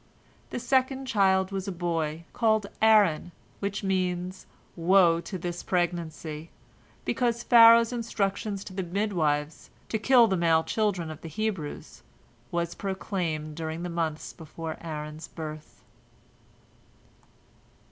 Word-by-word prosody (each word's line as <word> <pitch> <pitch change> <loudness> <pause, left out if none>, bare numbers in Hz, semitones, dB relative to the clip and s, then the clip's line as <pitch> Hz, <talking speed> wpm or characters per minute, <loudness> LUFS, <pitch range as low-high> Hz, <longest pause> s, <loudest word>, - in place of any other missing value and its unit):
The - - -4
second 260 +2 +1
child 190 -5 +2
was 195 0 -3
a - - -1
boy, 165 -3 -2
called 220 -3 +2 0.2
Aaron, 205 -7 +4 0.3
which 200 +1 -3
means, 185 -1 -2 0.3
"Woe 175 -1 +5
unto 185 +3 -5
this 175 0 -4
pregnancy!" 165 -3 -2 0.6
because 235 -1 0
Pharaoh's 230 0 +7
instructions 200 -3 -2
to 195 - -10
the 190 - -2
midwives, 170 -6 -1 0.2
to 220 - -1
kill 245 +1 +6
the 195 -4 +1
male 165 -2 +3
children 190 -7 -1
of 155 - -10
the 165 - -7
Hebrews, 190 -4 -4 0.5
was 170 0 -2
proclaimed 175 -6 -3
during 160 +1 -4
the 180 - -3
months 165 -2 -3
before 160 0 -7
Aaron's 155 -1 -6
birth. 155 -1 -9
180 Hz, 120 wpm, -27 LUFS, 160-210 Hz, 0.6 s, Pharaoh's